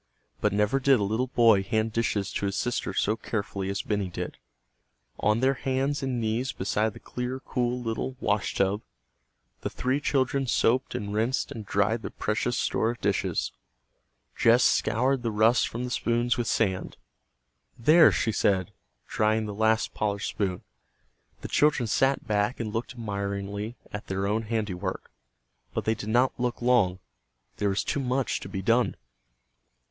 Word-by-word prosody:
But - - +2
never 105 +6 +2
did 135 -2 +4
a - - 0
little 110 +6 0
boy 115 -5 +5
hand 110 +2 -1
dishes 105 -3 -1
to 100 - -1
his 100 - -2
sister 120 +3 -1
so 105 - +1
carefully 100 -4 -3
as 100 0 -2
Benny 100 -3 -1
did. 85 - -6 0.8
On 105 +2 +2
their 135 +1 +4
hands 135 +2 -1
and 130 -2 -1
knees 115 +4 -1
beside 105 0 -1
the - - -11
clear, 125 +1 -4
cool 125 -1 -1
little 120 +2 -3
"washtub," 100 -1 0 0.8
the - - -2
three 130 +3 -1
children 135 -1 +1
soaped 120 +2 +2
and 100 0 -4
rinsed 115 +5 0
and 110 -3 -7
dried 105 +4 +1
their - - -5
precious 120 +3 -1
store 110 - +1
of 120 0 -4
dishes. 100 -1 0 0.8
Jess 120 +2 +5
scoured 130 +3 +2
the 115 - -1
rust 110 +3 +3
from 120 +2 -5
the 125 - -4
spoons 120 +1 +1
with 120 -2 -2
sand. 95 -4 0 0.8
"There!" 155 +8 +7
she 115 - 0
said, 100 -2 +1 0.3
drying 110 +1 +1
the 105 - -5
last 110 +2 +1
polished 100 -1 -1
spoon. 95 -4 -2 0.8
The - - -5
children 145 -4 +3
sat 135 +5 +1
back 105 +3 0
and 110 -3 -3
looked 120 +3 -3
admiringly 100 0 -4 0.2
at 105 - -6
their 95 0 -1
own 105 +3 +1
handiwork. 100 -4 -3 0.6
But - - -2
they 110 - +3
did 110 -1 -6
not 125 +4 +2
look 125 -1 -1
long. 120 -7 +3 0.6
There 100 - +1
was 95 - 0
too - - -1
much 130 0 0
to - - -8
be 95 -2 -4
done. 115 +1 +2
110 Hz, 165 wpm, -27 LUFS, 100-125 Hz, 0.8 s, There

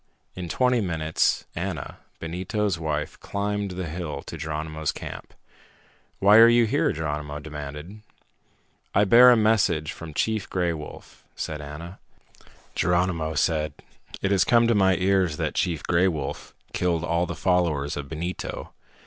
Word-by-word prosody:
In 90 -2 -6
twenty 125 +2 +2
minutes, 80 -4 0
Ana, 85 -5 -5 0.2
Benito's 90 +3 -2
wife, 80 +1 -3
climbed 100 0 -2
the 95 - -3
hill 80 -1 -5
to - - -8
Geronimo's 80 0 -3
camp. - - -8 0.9
"Why 100 +2 +6
are 115 +1 +10
you 120 0 +5
here?" 135 +7 +1
Geronimo 75 -1 -4
demanded. 75 +6 -8 0.9
"I 100 - +5
bear 120 +5 +8
a 120 - +6
message 100 -8 +2
from 80 -3 -9
Chief 110 -3 -1
Gray 90 -2 0
Wolf," 75 -2 -10
said 75 -1 -4
Ana. 75 +5 -9 0.7
Geronimo 85 -3 0
said, 75 0 +1 0.5
"It 100 - +1
has 95 -3 +4
come 120 -1 +4
to 115 - +3
my 95 -3 +4
ears 95 -4 +1
that - - -2
Chief 85 -4 -1
Gray 85 +2 +3
Wolf 75 -6 -4 0.2
killed 85 -2 0
all 85 +1 0
the - - -4
followers 85 -6 +1
of 70 -1 -6
Benito. 85 +3 -5
85 Hz, 145 wpm, -25 LUFS, 80-100 Hz, 0.9 s, are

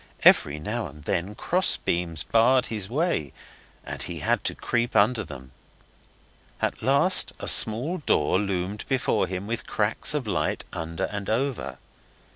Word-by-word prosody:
Every 75 +1 +5
now 105 +7 -3
and 75 0 -13
then 95 +4 -2
cross 185 +10 +2
beams 85 -3 -2
barred 125 +3 +3
his 100 -3 -3
way, 140 - -1 0.5
and - - -6
he - - -4
had - - 0
to - - -1
creep 120 0 -1
under 110 +2 +3
them. 65 -6 -11 1.1
At - - -2
last - - +3
a - - -6
small 130 +12 +4
door 90 - +1
loomed 100 0 -3
before 130 -2 +1
him 95 +1 -5
with 115 +2 -4
cracks 110 +7 0
of 145 -4 -2
light 105 - -1
under 80 0 -4
and 100 -1 -4
over. 115 - -2
105 Hz, 150 wpm, -25 LUFS, 85-120 Hz, 1.1 s, Every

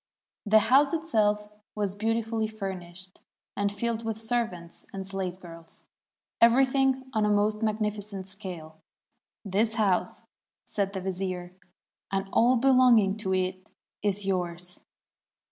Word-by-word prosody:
The 215 +1 +6 0.2
house 280 +2 +6
itself 215 -11 +1 0.3
was 205 -3 -1
beautifully 225 +1 0
furnished, 190 -3 -7 0.3
and 200 0 0
filled 230 +2 -2
with 225 -1 -3
servants 220 -7 -3
and 195 -1 -6
slave 190 -2 -4
girls 165 -2 -13 0.3
— - - -64
everything 265 +2 +4
on 215 -1 +2
a 210 - +2
most 210 +1 +2
magnificent 210 -3 -2
scale. 175 -5 -8 0.6
'This 215 +3 +1
house,' 200 -5 +1 0.4
said 200 -1 -1
the 190 - -3
vizier, 185 -1 -4 0.6
'and 195 0 -1
all 245 +3 +5
belonging 250 -6 +5
to 190 -3 -1
it 185 0 -2 0.3
is 205 -1 -1
yours.' 180 -1 -3
205 Hz, 125 wpm, -28 LUFS, 185-225 Hz, 0.6 s, The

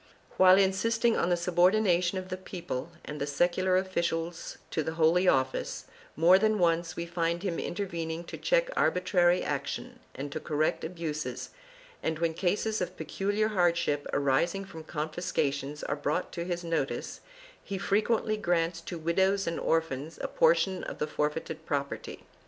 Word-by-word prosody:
While 185 0 +8
insisting 225 +4 +2
on 175 - +1
the 175 - +3
subordination 180 +1 +3
of 185 0 -5
the 185 - -2
people 170 -6 -5 0.2
and 150 -1 -6
the 140 - -1
secular 180 +5 +2
officials 170 -3 -2
to 160 - 0
the 160 +2 -3
Holy 170 +3 +4
Office, 130 -4 +1 0.3
more 175 +4 +6
than 215 0 +2
once 170 -2 +1
we 170 - -3
find 170 +1 -1
him 180 -4 -1
intervening 170 -4 -3
to - - -8
check - - +1
arbitrary 180 -1 +3
action - - -4 0.2
and 140 +2 -5
to 155 - -3
correct 155 0 0
abuses 160 -3 -4 0.5
and, 160 - -1
when 165 0 0
cases 205 +5 0
of 180 0 -3
peculiar 205 +2 -1
hardship 170 -7 +1
arising 170 +8 +1
from 160 -4 -10
confiscations 150 -3 -2
are 145 - -1
brought 150 +4 -2
to 170 -1 -4
his 175 -1 -3
notice, 165 -5 -2 0.4
he 195 - -4
frequently 215 +2 +1
grants 170 -3 0
to 170 +1 -6
widows 190 +4 +1
and 165 - -2
orphans 160 -2 -1
a - - 0
portion 485 - +2
of - - -6
the - - 0
forfeited 155 +1 -3
property. 140 -1 -3
170 Hz, 155 wpm, -29 LUFS, 160-190 Hz, 0.5 s, While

